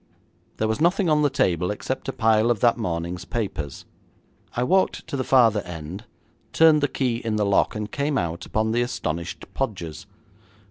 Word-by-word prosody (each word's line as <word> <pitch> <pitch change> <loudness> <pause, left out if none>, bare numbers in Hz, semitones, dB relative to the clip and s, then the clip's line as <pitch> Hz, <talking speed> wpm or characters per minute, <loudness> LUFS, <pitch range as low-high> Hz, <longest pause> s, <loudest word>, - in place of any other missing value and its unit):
There 110 - 0
was 110 +6 -1
nothing 180 +2 +3
on 150 0 +4
the 145 - +3
table 90 -7 +1
except 130 +5 -4
a - - 0
pile 110 0 +3
of 120 -3 +1
that 120 -1 +5
morning's 90 -5 -3
papers. 90 - -4 0.7
I 125 - +1
walked 185 +8 +1
to - - -5
the 130 - -1
farther 115 -5 +4
end, 90 +4 -8 0.5
turned 160 -2 +6
the 145 - +3
key 125 -4 -1
in 115 -2 -2
the 105 -1 +1
lock, 100 +2 +2
and 105 0 -4
came 140 0 -1
out 85 -3 -3
upon 110 0 0
the 120 +2 +1
astonished 85 -8 -3
Podgers. 95 - -4
110 Hz, 180 wpm, -24 LUFS, 90-130 Hz, 0.7 s, turned